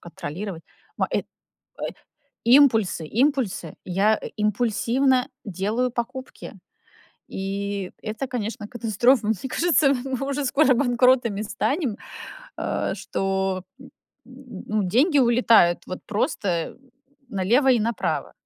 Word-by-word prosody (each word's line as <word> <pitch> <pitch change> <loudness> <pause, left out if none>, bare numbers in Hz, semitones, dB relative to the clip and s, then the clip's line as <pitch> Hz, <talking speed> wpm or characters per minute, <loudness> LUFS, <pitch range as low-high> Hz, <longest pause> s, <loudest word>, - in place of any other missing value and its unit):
контролировать, 175 0 -7 0.4
м, - - +3
э, - - +1
э, - - -12 1.2
импульсы 230 - +4 0.2
импульсы. 245 - -1
Я 200 +4 +2 0.2
импульсивно 245 +5 +1 0.2
делаю 210 +6 -1
покупки. 255 +2 -6 0.8
И 195 0 -3
это, 220 +5 -4
конечно, 230 -3 -4
катастрофа. 235 +1 +2
Мне 220 - +2
кажется, 325 0 +3
м 275 - +2 0.2
мы 275 - -3
уже 280 0 -1
скоро 270 +1 +4
банкротами 245 -4 +3
станем, 220 - -1 0.6
э, - - -2
что, 190 -1 -2 0.2
н 270 - -12 0.4
н 255 -5 -11
ну, 215 -1 0
деньги 275 - +3
улетают, 230 -8 +4
вот, 185 - -6
просто 190 -4 -1 0.5
налево 225 +8 +2
и 240 - +2
направо. 230 +2 -2
225 Hz, 110 wpm, -24 LUFS, 195-255 Hz, 1.2 s, импульсы